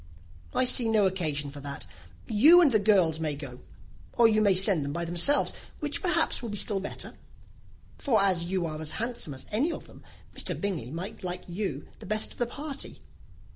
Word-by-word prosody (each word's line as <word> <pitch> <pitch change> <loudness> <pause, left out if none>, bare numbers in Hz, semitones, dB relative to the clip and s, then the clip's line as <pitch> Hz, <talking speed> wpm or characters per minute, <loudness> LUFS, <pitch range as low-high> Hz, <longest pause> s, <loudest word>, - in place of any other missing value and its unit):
"I - - +3
see 245 -2 +2
no 215 -2 +3
occasion 155 -7 -1
for 145 - -10
that. 140 -6 -6 0.4
You 285 +11 +6
and 325 -6 +5
the 215 - +3
girls 190 -7 +3
may 155 -2 -1
go 135 -4 -8 0.5
or 235 -2 +5
you 215 -1 +2
may 200 -3 +4
send 185 -4 +5
them 140 0 -4
by 170 +1 -2
themselves, 175 - +3 0.3
which 295 -1 -3
perhaps 355 -3 +1
will 235 - -5
be 210 - -5
still 200 -1 +1
better; 195 - -6 0.9
for 240 -7 +2
as 185 -4 +2
you 185 0 -1
are 155 -1 -5
as 155 - -4
handsome 230 - -3
as 130 - -8
any 265 +11 +1
of - - -7
them, - - -16 0.3
Mr. - - -2
Bingley 185 - -3
might 175 +9 -7
like 180 0 -3
you 175 -6 -4
the - - -11
best 215 0 -2
of - - -13
the 240 - +1
party." 285 +3 -6
195 Hz, 200 wpm, -28 LUFS, 160-225 Hz, 0.9 s, You